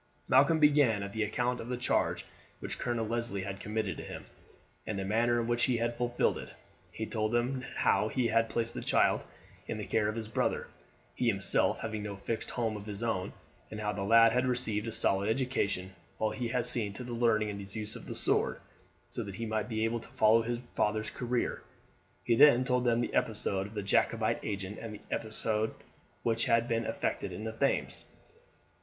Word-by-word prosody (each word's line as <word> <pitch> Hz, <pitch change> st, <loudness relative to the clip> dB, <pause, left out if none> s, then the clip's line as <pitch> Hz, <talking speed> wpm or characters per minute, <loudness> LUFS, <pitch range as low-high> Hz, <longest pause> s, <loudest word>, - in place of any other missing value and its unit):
Malcolm 140 Hz, +5 st, +5 dB
began 145 Hz, -9 st, +4 dB
at 100 Hz, 0 st, -6 dB
the 110 Hz, -, -2 dB
account 125 Hz, +3 st, 0 dB
of 115 Hz, -, -7 dB
the 125 Hz, -, -1 dB
charge 125 Hz, -, 0 dB, 0.3 s
which -, -, -5 dB
Colonel 120 Hz, -2 st, -1 dB
Leslie 115 Hz, -3 st, -2 dB
had 95 Hz, 0 st, -5 dB
committed 105 Hz, -4 st, -2 dB
to -, -, -6 dB
him, -, -, -8 dB, 0.6 s
and 105 Hz, -, -2 dB
the 95 Hz, -, -2 dB
manner 120 Hz, +4 st, +2 dB
in 115 Hz, -, -1 dB
which 120 Hz, 0 st, +2 dB
he 125 Hz, -3 st, +1 dB
had 120 Hz, +1 st, -1 dB
fulfilled 120 Hz, 0 st, 0 dB
it. -, -, -10 dB, 0.4 s
He 110 Hz, -, -4 dB
told 110 Hz, 0 st, -1 dB
them 125 Hz, +2 st, +1 dB
how 105 Hz, -, +3 dB
he 120 Hz, +1 st, 0 dB
had 115 Hz, 0 st, +2 dB
placed 115 Hz, -1 st, -1 dB
the -, -, -5 dB
child -, -, +2 dB, 0.4 s
in 115 Hz, -, -3 dB
the 105 Hz, -, -4 dB
care 105 Hz, -2 st, +1 dB
of 105 Hz, -, -3 dB
his 115 Hz, -2 st, -4 dB
brother, 110 Hz, -, -1 dB, 0.4 s
he 125 Hz, -, -1 dB
himself 100 Hz, -4 st, +1 dB
having 110 Hz, -1 st, -3 dB
no 105 Hz, -1 st, -5 dB
fixed 110 Hz, +3 st, -3 dB
home 115 Hz, -3 st, -1 dB
of 105 Hz, 0 st, -8 dB
his 105 Hz, +1 st, -5 dB
own, 100 Hz, -6 st, -1 dB, 0.4 s
and 110 Hz, -, -6 dB
how 105 Hz, -1 st, -1 dB
the 100 Hz, -, -4 dB
lad 115 Hz, +3 st, +6 dB
had 125 Hz, +2 st, +1 dB
received 115 Hz, -4 st, 0 dB
a -, -, -2 dB
solid 100 Hz, -2 st, +1 dB
education, 110 Hz, -7 st, -1 dB, 0.2 s
while 110 Hz, -, 0 dB
he 125 Hz, -2 st, -3 dB
had 120 Hz, 0 st, 0 dB
seen 115 Hz, -4 st, 0 dB
to 125 Hz, -, -7 dB
his 120 Hz, 0 st, -6 dB
learning 110 Hz, -3 st, +2 dB
the -, -, -6 dB, 0.2 s
use 105 Hz, 0 st, -5 dB
of -, -, -10 dB
his -, -, -1 dB
sword, -, -, +2 dB, 0.5 s
so -, -, -4 dB
that 100 Hz, -2 st, -6 dB
he 115 Hz, -, -4 dB
might 110 Hz, -1 st, -2 dB
be 110 Hz, -1 st, 0 dB
able 115 Hz, +1 st, -1 dB
to -, -, -11 dB
follow 115 Hz, -2 st, +4 dB
his 120 Hz, +1 st, -2 dB, 0.2 s
father's 110 Hz, +1 st, 0 dB
career. 125 Hz, -1 st, -2 dB, 0.6 s
He 120 Hz, -, +2 dB
then 130 Hz, 0 st, +7 dB
told 125 Hz, -1 st, +1 dB
them 120 Hz, 0 st, +3 dB
the -, -, -3 dB
episode 100 Hz, -3 st, 0 dB
of 105 Hz, -, -13 dB
the 105 Hz, -, -2 dB
Jacobite 100 Hz, -, +2 dB
agent, 100 Hz, -1 st, -4 dB
and 110 Hz, -2 st, -6 dB
the 110 Hz, -, -4 dB
escape 110 Hz, 0 st, 0 dB, 0.5 s
which 115 Hz, -1 st, +1 dB
had 115 Hz, 0 st, +3 dB
been 115 Hz, -1 st, 0 dB
effected -, -, -2 dB
in 110 Hz, -, -6 dB
the 110 Hz, -, -3 dB
Thames. 110 Hz, -, -1 dB
115 Hz, 210 wpm, -31 LUFS, 105-120 Hz, 0.6 s, then